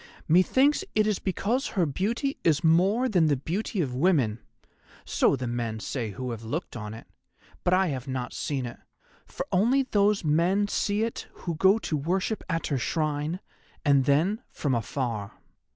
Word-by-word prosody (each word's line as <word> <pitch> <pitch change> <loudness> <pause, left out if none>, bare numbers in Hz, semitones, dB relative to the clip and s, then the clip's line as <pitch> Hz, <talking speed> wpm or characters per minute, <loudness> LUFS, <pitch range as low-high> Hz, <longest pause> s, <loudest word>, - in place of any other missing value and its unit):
Methinks 260 - +4
it 215 0 +4
is 210 -2 0
because 220 +7 -1
her 185 -5 +1
beauty 225 - -1
is 160 0 +2
more 190 +10 +4
than 180 -9 +3
the 145 - +3
beauty 185 - -2
of 135 -6 -2
women, 130 - +2 0.7
so - - +2
the 130 -1 -4
men 120 -2 -3
say 115 0 -3
who 125 +5 -5
have 115 -2 -6
looked 145 +9 -4
on 105 -1 -6
it, 115 - -11 0.6
but 175 - +2
I 185 0 +3
have 135 -2 -4
not 130 -2 -3
seen 135 -4 -2
it, 120 - -8 0.5
for - - -5
only 240 +9 +3
those 205 -5 +2
men 175 +7 +2
see 205 +1 0
it 230 - -4 0.2
who 170 - -1
go 190 +6 +4
to 170 - -3
worship 185 +9 -1
at 165 -1 -1
her 140 -4 -1
shrine, 155 +5 -1 0.4
and 140 -2 +4
then 170 - +2
from 140 -3 -2
afar. 115 -3 -2
165 Hz, 170 wpm, -27 LUFS, 130-200 Hz, 0.7 s, Methinks